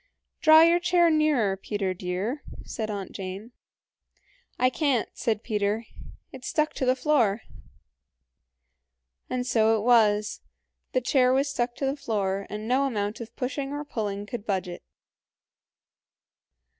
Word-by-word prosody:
"Draw 315 Hz, 0 st, +8 dB
your 340 Hz, +1 st, +5 dB
chair 350 Hz, -1 st, +3 dB
nearer, 295 Hz, -11 st, +2 dB
Peter 195 Hz, -1 st, -3 dB
dear," 185 Hz, -, -3 dB, 0.2 s
said 220 Hz, -1 st, -4 dB
Aunt 200 Hz, -2 st, -5 dB
Jane. 195 Hz, +4 st, -7 dB, 1.1 s
"I 255 Hz, 0 st, +3 dB
can't" 275 Hz, -6 st, +1 dB
said 220 Hz, -3 st, -1 dB
Peter, 210 Hz, 0 st, -1 dB, 0.5 s
"it's 260 Hz, -1 st, -8 dB
stuck 305 Hz, 0 st, 0 dB
to 260 Hz, -, -2 dB
the 255 Hz, -, +4 dB
floor." 245 Hz, -7 st, +2 dB, 1.9 s
And 250 Hz, -1 st, -2 dB
so 225 Hz, -2 st, +3 dB
it 210 Hz, -, -3 dB
was; 215 Hz, -3 st, +3 dB, 0.5 s
the 255 Hz, -, +2 dB
chair 250 Hz, 0 st, +3 dB
was 275 Hz, +2 st, +2 dB
stuck 240 Hz, -3 st, -2 dB
to 275 Hz, -, -3 dB
the 270 Hz, +1 st, 0 dB
floor, 200 Hz, -7 st, -2 dB
and 210 Hz, +1 st, -6 dB
no 260 Hz, +3 st, +2 dB
amount 210 Hz, -3 st, -2 dB
of 230 Hz, 0 st, -9 dB
pushing 275 Hz, +2 st, -3 dB
or 295 Hz, +1 st, -4 dB
pulling 205 Hz, -6 st, -4 dB
could 210 Hz, 0 st, -6 dB
budge 190 Hz, -4 st, -1 dB
it. 175 Hz, -1 st, -8 dB
235 Hz, 140 wpm, -26 LUFS, 205-275 Hz, 1.9 s, Draw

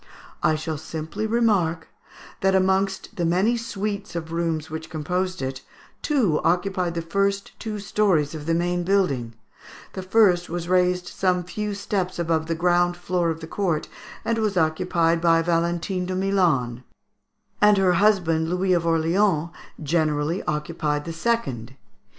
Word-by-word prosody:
"I 155 Hz, -, +3 dB
shall 155 Hz, -1 st, -4 dB
simply 160 Hz, +7 st, -4 dB
remark, 205 Hz, -8 st, +1 dB, 0.5 s
that 190 Hz, 0 st, +2 dB
amongst 190 Hz, +2 st, 0 dB
the 175 Hz, -, -1 dB
many 185 Hz, +8 st, +2 dB
suites 210 Hz, -4 st, -4 dB
of 165 Hz, -1 st, -4 dB
rooms 165 Hz, -2 st, -1 dB
which 160 Hz, 0 st, -7 dB
composed 180 Hz, +3 st, -2 dB
it, 130 Hz, 0 st, -4 dB, 0.4 s
two 230 Hz, -, +1 dB
occupied 180 Hz, -1 st, 0 dB
the 165 Hz, -, -2 dB
two -, -, -21 dB
first 200 Hz, 0 st, 0 dB, 0.3 s
stories 190 Hz, -7 st, +1 dB
of 155 Hz, -1 st, -7 dB
the 165 Hz, -, +2 dB
main 175 Hz, +1 st, 0 dB
building; 145 Hz, -, 0 dB, 0.6 s
the 190 Hz, -, -5 dB
first 185 Hz, -2 st, +3 dB
was 170 Hz, 0 st, -4 dB
raised 180 Hz, 0 st, +2 dB
some 180 Hz, -1 st, 0 dB
few 205 Hz, +4 st, -4 dB
steps 195 Hz, -2 st, -2 dB
above 165 Hz, -2 st, 0 dB
the 165 Hz, -, -1 dB
ground 175 Hz, +1 st, +2 dB
floor 175 Hz, -1 st, 0 dB
of 165 Hz, 0 st, -3 dB
the -, -, -6 dB
court, 170 Hz, -5 st, -1 dB, 0.4 s
and 230 Hz, -1 st, 0 dB
was 210 Hz, -3 st, 0 dB
occupied 165 Hz, 0 st, +1 dB
by 165 Hz, -1 st, +4 dB
Valentine 175 Hz, +2 st, 0 dB
de 185 Hz, -, -2 dB
Milan; 170 Hz, -11 st, +1 dB, 0.8 s
and 210 Hz, -1 st, +6 dB
her 190 Hz, -2 st, +3 dB
husband, 170 Hz, -5 st, +2 dB
Louis 180 Hz, +1 st, +1 dB
of 170 Hz, -1 st, +1 dB
Orleans, 165 Hz, +1 st, +2 dB, 0.3 s
generally 155 Hz, +1 st, 0 dB
occupied 150 Hz, -1 st, -2 dB
the 165 Hz, -, -5 dB
second. 160 Hz, -, -2 dB
175 Hz, 150 wpm, -24 LUFS, 160-195 Hz, 0.8 s, and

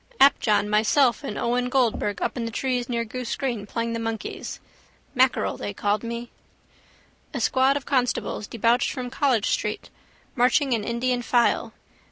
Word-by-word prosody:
Apjohn, 225 Hz, -7 st, +4 dB
myself 220 Hz, +4 st, +3 dB
and 210 Hz, -, -4 dB
Owen 245 Hz, +1 st, 0 dB
Goldberg 235 Hz, -5 st, 0 dB
up -, -, -1 dB
in 240 Hz, -2 st, -3 dB
the -, -, -2 dB
trees 250 Hz, +1 st, -1 dB
near 235 Hz, -1 st, -1 dB
Goose 245 Hz, +1 st, -4 dB
green 235 Hz, -7 st, -3 dB
playing 230 Hz, +2 st, -2 dB
the 230 Hz, -, -2 dB
monkeys. 225 Hz, -1 st, -5 dB, 0.5 s
Mackerel 260 Hz, -1 st, +2 dB
they 205 Hz, -, -5 dB
called 205 Hz, +1 st, 0 dB
me. 235 Hz, 0 st, -6 dB, 1.0 s
A -, -, -1 dB
squad 265 Hz, +2 st, +3 dB
of 280 Hz, -, -7 dB
constables 250 Hz, -5 st, -1 dB
debouched 235 Hz, +2 st, +1 dB
from 250 Hz, -2 st, -5 dB
College 260 Hz, -7 st, +1 dB
street, 210 Hz, 0 st, -2 dB, 0.4 s
marching 255 Hz, +2 st, +3 dB
in 225 Hz, -3 st, 0 dB
Indian 245 Hz, +2 st, -1 dB
file. 240 Hz, 0 st, +1 dB
240 Hz, 155 wpm, -24 LUFS, 225-255 Hz, 1.0 s, Apjohn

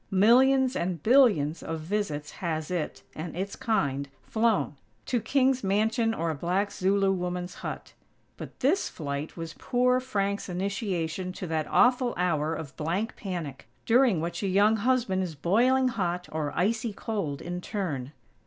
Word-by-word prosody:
Millions 255 Hz, +6 st, +5 dB
and 170 Hz, -3 st, -2 dB
billions 210 Hz, -, +4 dB
of 160 Hz, 0 st, -4 dB
visits 155 Hz, -4 st, -3 dB
has 160 Hz, -2 st, -3 dB
it, 170 Hz, -4 st, -3 dB
and 160 Hz, +1 st, -6 dB
its 195 Hz, +2 st, -3 dB
kind, 140 Hz, -, -1 dB
flown 220 Hz, -8 st, +1 dB, 0.3 s
to 245 Hz, -3 st, 0 dB
king's 260 Hz, +1 st, +2 dB
mansion 220 Hz, +4 st, +2 dB
or 165 Hz, -7 st, -1 dB
a -, -, -2 dB
black 180 Hz, +7 st, -1 dB
Zulu 195 Hz, 0 st, +2 dB
woman's 180 Hz, -1 st, -3 dB
hut. -, -, -6 dB, 0.4 s
But -, -, -10 dB
this 300 Hz, +10 st, +2 dB
flight 145 Hz, 0 st, -5 dB
was 165 Hz, -1 st, -5 dB
poor 250 Hz, 0 st, +2 dB
Frank's 200 Hz, -6 st, -2 dB
initiation 185 Hz, -2 st, -2 dB
to 185 Hz, -, -6 dB
that 160 Hz, -2 st, -1 dB
awful 245 Hz, 0 st, +3 dB
hour 160 Hz, -3 st, +1 dB
of 145 Hz, -4 st, -7 dB
blank 180 Hz, +9 st, -2 dB
panic, 170 Hz, -9 st, -6 dB, 0.2 s
during 235 Hz, -6 st, +4 dB
which 170 Hz, +1 st, -3 dB
a 200 Hz, -, -1 dB
young 205 Hz, +4 st, +4 dB
husband 230 Hz, -4 st, +1 dB
is 175 Hz, -4 st, -4 dB
boiling 250 Hz, -, +3 dB
hot 180 Hz, -6 st, -2 dB
or 155 Hz, -2 st, -2 dB
icy 220 Hz, +3 st, 0 dB
cold 195 Hz, -10 st, -3 dB
in 175 Hz, +1 st, -5 dB
turn. 150 Hz, -11 st, -3 dB
190 Hz, 155 wpm, -28 LUFS, 165-225 Hz, 0.4 s, Millions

